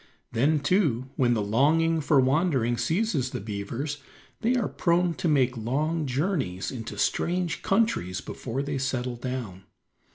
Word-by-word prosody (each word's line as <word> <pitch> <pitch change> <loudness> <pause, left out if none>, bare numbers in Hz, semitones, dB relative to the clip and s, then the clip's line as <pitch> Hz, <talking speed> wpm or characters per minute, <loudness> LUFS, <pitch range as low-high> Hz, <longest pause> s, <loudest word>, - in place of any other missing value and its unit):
Then, 145 +6 +2
too, 145 - +1
when 120 -2 +3
the 105 - 0
longing 155 +9 +3
for 145 -1 +4
wandering 130 -3 +2
seizes 155 - 0
the - - -4
beavers 115 +8 -4 0.4
they 235 +3 +1
are 240 -5 +1
prone 175 0 +1
to 170 - -2
make 130 -5 +3
long 150 +7 -1
journeys 130 - -1
into 115 -3 -6
strange 175 0 0
countries 195 - +1
before 130 +4 -4
they 140 -1 -2
settle 130 -2 -2
down. 120 -7 -5
135 Hz, 140 wpm, -27 LUFS, 120-165 Hz, 0.4 s, for